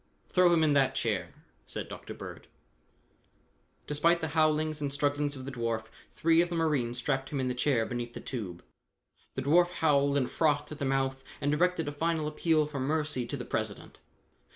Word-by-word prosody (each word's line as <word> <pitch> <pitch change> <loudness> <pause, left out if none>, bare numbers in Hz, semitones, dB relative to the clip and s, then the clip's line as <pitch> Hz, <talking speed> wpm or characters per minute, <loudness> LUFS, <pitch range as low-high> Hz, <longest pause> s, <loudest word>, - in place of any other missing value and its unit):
"Throw 180 -1 +5
him 165 -2 +4
in 150 -2 +4
that 135 -1 +3
chair," - - -1 0.4
said - - -5
Dr. - - -8
Bird. - - -9 1.4
Despite 165 +4 +2
the 160 - -2
howlings 155 -1 +2
and 140 -1 -1
strugglings 145 0 0
of 130 -1 -8
the 140 - -5
dwarf, 115 -3 -2 0.3
three 165 +1 +4
of 175 - 0
the 175 - -3
marines 145 -8 0
strapped 135 +2 -1
him 140 - -2
in 130 -1 0
the - - 0
chair 125 -2 +1
beneath 120 0 -4
the - - -5
tube. 95 -9 -6 0.7
The 130 - -2
dwarf 175 +5 +5
howled 145 -5 +2
and 130 -3 +1
frothed 150 -2 +1
at 150 - -7
the 140 - -1
mouth 135 0 0 0.2
and 145 - 0
directed 165 +1 +1
a - - -1
final 160 +1 0
appeal 155 0 +2
for 145 -2 -5
mercy 145 -2 -1
to - - -3
the - - -6
President. - - -4
145 Hz, 190 wpm, -30 LUFS, 135-160 Hz, 1.4 s, Throw